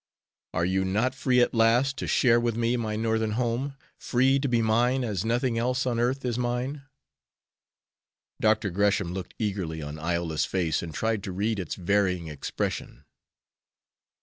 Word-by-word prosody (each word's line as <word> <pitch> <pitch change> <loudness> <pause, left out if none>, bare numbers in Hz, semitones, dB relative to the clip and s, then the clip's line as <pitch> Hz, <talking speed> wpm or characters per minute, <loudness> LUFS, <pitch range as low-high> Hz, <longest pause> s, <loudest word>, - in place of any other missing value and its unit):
Are 85 - +1
you 95 +1 +1
not 110 +7 +1
free 130 -1 +2
at 120 - +2
last 120 +4 +3
to - - -4
share 120 -2 +4
with 120 -1 0
me 120 +1 +1
my 110 -3 -2
Northern 110 0 0
home, 125 +4 -1 0.2
free 130 +2 +2
to 140 - -1
be 120 -2 +2
mine 120 +4 +2
as 105 -6 -2
nothing 120 +1 0
else 125 +2 0
on 120 -2 0
earth 130 +3 0
is 120 -1 -1
mine." 125 +4 -2 1.6
Dr. 110 -2 +2
Gresham 100 -1 +1
looked 95 -1 -6
eagerly 95 -7 -2
on 75 +1 -6
Iola's 85 -1 -1
face, 85 -4 0
and 85 - -6
tried 110 +5 -1
to 95 - -4
read 105 +3 -1
its 90 - -4
varying 90 -3 0
expression. 70 -1 -4
110 Hz, 160 wpm, -27 LUFS, 95-120 Hz, 1.6 s, share